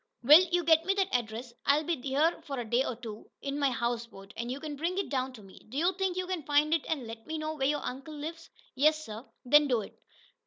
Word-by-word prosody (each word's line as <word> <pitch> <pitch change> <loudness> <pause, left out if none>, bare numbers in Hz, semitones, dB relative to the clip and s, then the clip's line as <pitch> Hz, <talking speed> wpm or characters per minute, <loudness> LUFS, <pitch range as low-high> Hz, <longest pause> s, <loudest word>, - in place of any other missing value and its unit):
"Will, 300 +8 +9
you 350 0 +2
get 320 0 +5
me 390 +3 +1
that 390 -1 0
address. 235 0 -2
I'll 290 +2 +4
be 340 +2 0
here 285 +5 +1
a 260 -4 -3
day 240 +4 +2
or 250 - -4
so, 220 -1 -8
in 280 +1 -3
my 280 -1 +3
houseboat, 235 -5 -4
and 235 +1 -4
you 265 - -4
can 300 0 -5
bring 340 +6 -2
it 395 - -1
down 260 -1 -1
to 220 -4 -12
me. 190 -1 -15
Do 260 - -6
you 350 +5 +2
think 380 -1 -1
you 370 - -1
can 365 -2 -3
find 295 +2 +2
it, 330 - +2
and 295 -6 -1
let 225 0 -9
me 315 0 -3
know 310 0 -3
where 270 -3 0
your 295 +1 -1
uncle 270 +4 -6
lives?" 330 +3 -7 0.2
"Yes, 310 +3 +3
sir." 220 +2 -7 0.2
"Then 295 +3 +6
do 245 -4 +2
it." - - -10
285 Hz, 250 wpm, -30 LUFS, 245-320 Hz, 0.2 s, Will